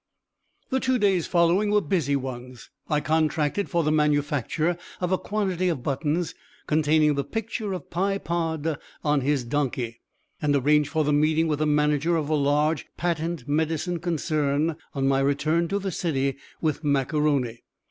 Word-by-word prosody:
The 260 - +2
two 260 -1 +1
days 195 -6 +2
following 175 +4 +3
were 210 0 +4
busy 155 -6 0
ones. 125 -2 -6 0.2
I 150 -1 +2
contracted 155 +4 0
for 170 -1 +1
the 155 - +1
manufacture 150 +2 +1 0.2
of 180 0 -1
a 185 - +3
quantity 190 -4 -1
of 145 -8 -2
buttons, 150 +5 -1 0.3
containing 155 0 +3
the 140 0 -1
picture 220 - -4
of 185 - -6
Pye 195 +3 0
Pod 160 -4 -2 0.2
on 150 -2 +2
his 140 -1 +1
donkey, 120 -3 -2 0.4
and 145 -2 +2
arranged 145 +2 +3
for 155 0 +1
the 150 0 +1
meeting 155 +2 +3
with 150 -2 -1
the 155 - +1
manager 150 +2 +2
of 155 -2 -2
a - - +1
large 150 +1 +1
patent 165 -4 -2
medicine 160 +3 0
concern 155 -2 0 0.2
on 135 -1 +1
my 135 0 +3
return 150 +5 +1
to 200 - -1
the 195 -1 -3
city 140 -6 -1 0.3
with 155 -1 -1
Mac 140 0 +1
A'Rony. 140 -6 +1
155 Hz, 165 wpm, -25 LUFS, 145-170 Hz, 0.4 s, were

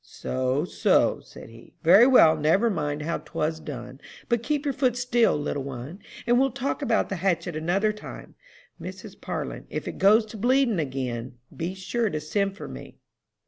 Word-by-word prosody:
"'So, 130 +4 -2
so,' - - +2
said - - -13
he. 115 0 -16
'Very 195 +9 +7
well, 165 -12 +7
never 165 +10 +2
mind 150 -4 -2
how 170 +2 -2
'twas 155 +1 -3
done, 130 -3 -8 0.3
but 235 -1 +2
keep 295 +3 -2
your 280 - 0
foot 255 -2 +1
still, 240 -7 +2
little 145 -1 -2
one, 135 +6 -7 0.3
and 240 +1 +3
we'll 270 +1 +3
talk 270 +4 -3
about 235 -6 +1
the 195 - -3
hatchet 175 -2 -1
another 185 +7 +1
time. 210 - -10 0.5
Mrs. - - -9
Parlin, - - -5
if - - -5
it - - -6
goes 215 +4 +5
to 220 +1 -10
bleeding 245 -2 +2
again, 130 -4 -4 0.2
be 175 +3 -4
sure 220 +4 -1
to 155 - -3
send 195 +6 -1
for - - -7
me.'" - - -10
185 Hz, 180 wpm, -25 LUFS, 150-235 Hz, 0.5 s, Very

